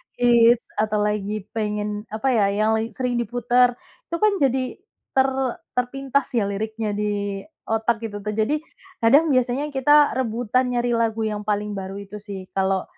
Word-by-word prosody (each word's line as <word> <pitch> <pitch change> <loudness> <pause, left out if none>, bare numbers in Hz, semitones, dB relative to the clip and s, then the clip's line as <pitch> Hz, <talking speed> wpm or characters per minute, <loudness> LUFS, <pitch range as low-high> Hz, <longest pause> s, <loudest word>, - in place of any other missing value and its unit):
hits 240 -1 +4
atau 215 -1 +1
lagi 210 0 -2
pengen 210 -1 -3
apa 225 +5 0
ya, 215 -5 +3
yang 215 +2 +1
lagi 220 +1 -1
sering 250 -2 -1
diputar, 245 +1 +2 0.3
itu 335 - -3
kan 425 -1 +5
jadi, 265 +2 0 0.4
ter 265 0 +5 0.5
terpintas 270 +2 0
ya, 230 - +3
liriknya 220 +2 -3
di 205 -1 -2 0.3
otak 225 +1 0
gitu 205 -2 -5
tuh 210 - -2
jadi 230 +8 +1 0.4
kadang 285 +7 +5
biasanya 255 +2 +1
kita 290 +2 +5
rebutan 250 0 0
nyari 240 0 +1
lagu 225 -1 0
yang 210 -1 -2
paling 210 0 -1
baru 190 0 -5
itu 200 +1 -8
sih, 200 -2 -8
kalau 190 -1 +1
225 Hz, 155 wpm, -23 LUFS, 210-250 Hz, 0.5 s, kan